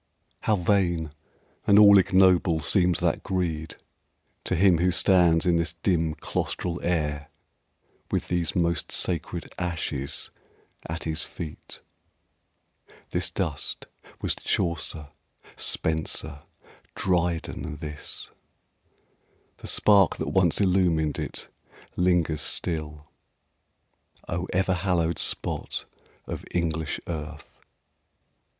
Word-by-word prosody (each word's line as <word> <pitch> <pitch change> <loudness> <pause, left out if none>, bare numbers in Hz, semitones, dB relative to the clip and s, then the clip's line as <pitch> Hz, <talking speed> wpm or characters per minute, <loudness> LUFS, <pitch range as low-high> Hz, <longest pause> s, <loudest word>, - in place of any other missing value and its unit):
How 110 - +2
vain 85 -4 +1 0.6
and 100 - +6
all 100 -1 +9
ignoble 95 -3 +4
seems 90 +2 +2
that - - +1
greed 80 -4 -2 0.7
To - - 0
him 90 -1 +4
who 90 +1 +3
stands 90 -2 +4
in 85 -1 +3
this 85 0 0
dim 85 -2 0
claustral 85 -1 -3
air 75 -4 -1 0.8
With - - -1
these 85 -3 -1
most 85 -1 0
sacred 85 -1 -1
ashes 80 -5 -2 0.6
at 80 +1 -4
his 80 0 -2
feet! 80 -1 -7 1.3
This - - 0
dust 70 -3 -3 0.4
was - - +1
Chaucer, 80 -4 -2 0.5
Spenser, 80 -2 -1 0.5
Dryden 85 -3 -1
this 75 -1 -7 1.3
The - - -9
spark 100 -3 +5
that - - -3
once 90 -4 +2
illumed 90 -6 +2
it - - -6 0.5
lingers 90 -4 +2
still. 75 -3 -1 1.2
O 85 +2 -3
ever 95 +1 +1
hallowed 85 -3 0
spot - - 0 0.4
of - - -6
English 80 -3 -1
earth! 80 -2 -7
85 Hz, 100 wpm, -26 LUFS, 80-90 Hz, 1.3 s, all